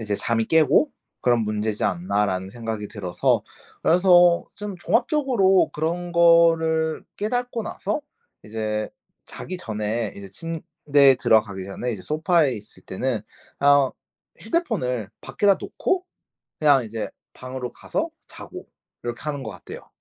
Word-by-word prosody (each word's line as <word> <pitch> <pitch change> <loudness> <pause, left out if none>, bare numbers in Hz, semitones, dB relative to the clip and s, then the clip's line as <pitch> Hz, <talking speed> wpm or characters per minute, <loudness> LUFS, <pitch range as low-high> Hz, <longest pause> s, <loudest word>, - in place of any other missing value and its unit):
이제 105 -2 -2
'잠이 115 0 0
깨고 160 - +4 0.3
그런 120 -2 +3
문제지 105 0 -1
않나?'라는 95 +1 0
생각이 110 -2 -5
들어서 90 -4 0 0.4
그래서 175 0 +5
좀 205 -2 -6
종합적으로 235 - +2
그런 170 +3 -2
거를 165 -2 +4
깨닫고 245 +2 -2
나서 210 +3 -3 0.4
이제 110 0 -3 0.4
자기 185 - -7
전에 110 - -3
이제 100 -1 -9
침대에 145 - +2
들어가기 105 -6 +2
전에 100 +6 -4
이제 105 - -5
소파에 155 -2 +2
있을 105 -3 -10
때는 120 +4 -2 0.4
아 140 -2 +5 0.5
휴대폰을 130 - -1
밖에다 200 -1 +2
놓고 370 -1 -1 0.6
그냥 145 -4 +5
이제 110 0 -4 0.3
방으로 130 -1 -6
가서 - - -3 0.2
자고 - - -10 0.4
이렇게 120 0 -5
하는 145 -3 -4
거 110 - -5
같아요. 90 -4 -11
135 Hz, 285 characters per minute, -23 LUFS, 110-170 Hz, 0.6 s, 그래서